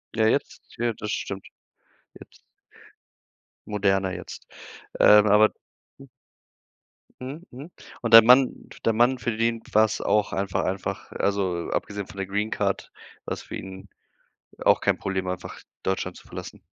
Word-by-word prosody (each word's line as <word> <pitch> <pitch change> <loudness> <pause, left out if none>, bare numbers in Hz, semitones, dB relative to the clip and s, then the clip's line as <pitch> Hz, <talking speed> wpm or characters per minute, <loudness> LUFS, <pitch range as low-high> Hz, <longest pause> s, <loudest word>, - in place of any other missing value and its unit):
Ja, 110 -1 +3
jetzt 140 - -1 0.2
ja, 120 0 0
das 105 0 -4
stimmt. 95 -3 -5 0.7
Jetzt - - -16 1.3
Moderner 95 -2 +1
jetzt. 90 - -9 0.5
Ähm, 105 0 +7
aber 105 +1 +5 0.5
Mhm. 135 - -13 1.1
Mhm, 140 +6 -7
mhm. 135 +6 -10 0.3
Und 115 -2 -2
dein 115 -1 +10
Mann 125 +2 +7 0.3
dein 115 - +1
Mann, 125 +3 +3
für 120 -2 -2
den 115 0 0
war 110 +1 +6
es 110 - -4
auch 105 -1 +1
einfach 95 -1 -1
einfach 95 0 -4
also, 95 -4 -1
abgesehen 100 -2 -3
von - - -13
der 95 - -2
Greencard, 100 0 -2 0.3
war - - -3
es - - -8
für - - -8
ihn 95 0 -10 0.8
auch - - +5
kein - - +1
Problem, 95 -1 -3
einfach 90 -1 -6 0.2
Deutschland 95 -1 -2
zu - - -15
verlassen? - - -9
105 Hz, 145 wpm, -25 LUFS, 95-115 Hz, 1.3 s, dein